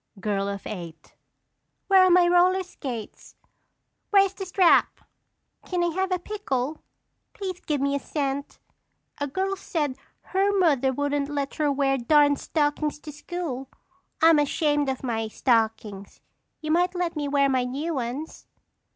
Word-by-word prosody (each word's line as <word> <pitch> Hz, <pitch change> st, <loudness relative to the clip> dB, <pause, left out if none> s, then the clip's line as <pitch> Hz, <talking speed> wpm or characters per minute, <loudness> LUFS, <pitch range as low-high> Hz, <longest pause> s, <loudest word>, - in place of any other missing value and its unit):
Girl 200 Hz, -1 st, -1 dB
of 200 Hz, -1 st, -6 dB
Eight. 170 Hz, -5 st, -8 dB, 0.7 s
Where 380 Hz, -1 st, +6 dB
are -, -, +4 dB
my 355 Hz, 0 st, +5 dB
roller 360 Hz, +2 st, +4 dB
skates? 250 Hz, -, -8 dB, 0.7 s
Where 395 Hz, -1 st, +6 dB
is 390 Hz, -, -5 dB
the 385 Hz, 0 st, -7 dB
strap? 365 Hz, -1 st, +3 dB, 0.7 s
Can 360 Hz, -2 st, 0 dB
I 345 Hz, -, +2 dB
have 380 Hz, +2 st, -1 dB
a 365 Hz, -, +2 dB
pickle? 315 Hz, -8 st, -3 dB, 0.5 s
Please 375 Hz, -3 st, -5 dB
give 300 Hz, -5 st, -2 dB
me 280 Hz, 0 st, +1 dB
a 280 Hz, -, 0 dB
cent. 280 Hz, 0 st, -3 dB, 0.6 s
A 285 Hz, -, -1 dB
girl 380 Hz, +7 st, -2 dB
said 300 Hz, -9 st, -3 dB, 0.2 s
her 390 Hz, +2 st, +1 dB
mother 285 Hz, -8 st, +3 dB
wouldn't 285 Hz, +1 st, -1 dB
let 285 Hz, -1 st, -3 dB
her 300 Hz, -2 st, +2 dB
wear 270 Hz, -1 st, +1 dB
darned 285 Hz, +3 st, +4 dB
stockings 295 Hz, -1 st, -1 dB
to 300 Hz, -, -8 dB
school. 295 Hz, -4 st, -5 dB, 0.5 s
I'm 325 Hz, -2 st, +7 dB
ashamed 295 Hz, -1 st, +1 dB
of 265 Hz, 0 st, -4 dB
my 225 Hz, -3 st, -2 dB
stockings. 220 Hz, -4 st, -1 dB, 0.4 s
You 310 Hz, 0 st, -3 dB
might 355 Hz, +3 st, +2 dB
let 350 Hz, -2 st, -2 dB
me 295 Hz, -1 st, -2 dB
wear 280 Hz, 0 st, +3 dB
my 260 Hz, -2 st, +1 dB
new 290 Hz, +7 st, -3 dB
ones. 265 Hz, +4 st, -5 dB
290 Hz, 150 wpm, -25 LUFS, 265-355 Hz, 0.7 s, I'm